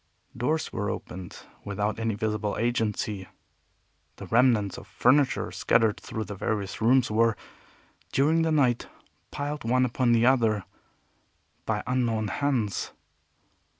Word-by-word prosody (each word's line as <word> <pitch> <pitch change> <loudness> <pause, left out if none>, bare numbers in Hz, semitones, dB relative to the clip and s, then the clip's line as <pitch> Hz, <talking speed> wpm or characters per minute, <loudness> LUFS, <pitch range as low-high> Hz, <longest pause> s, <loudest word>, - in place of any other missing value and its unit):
Doors 155 +7 -1
were 105 -2 -2
opened 90 0 -7 0.3
without 105 +2 -2
any 115 -2 -1
visible 105 -1 -2
agency. 110 -4 -1 0.9
The - - -9
remnants 115 -5 +2
of - - -14
furniture 135 +2 +2
scattered 115 -2 +2
through 110 - -5
the 105 - -7
various 100 0 -3
rooms 125 +1 +4
were, 115 0 +3 0.7
during 155 +4 +3
the 165 0 +1
night, 130 -6 +2 0.4
piled 145 0 -4
one 125 +2 +2
upon 125 0 +1
the 115 0 +4
other 115 -6 +3 1.0
by 105 -1 -1
unknown 115 -4 0
hands. 125 -8 -1
115 Hz, 120 wpm, -27 LUFS, 105-130 Hz, 1.0 s, rooms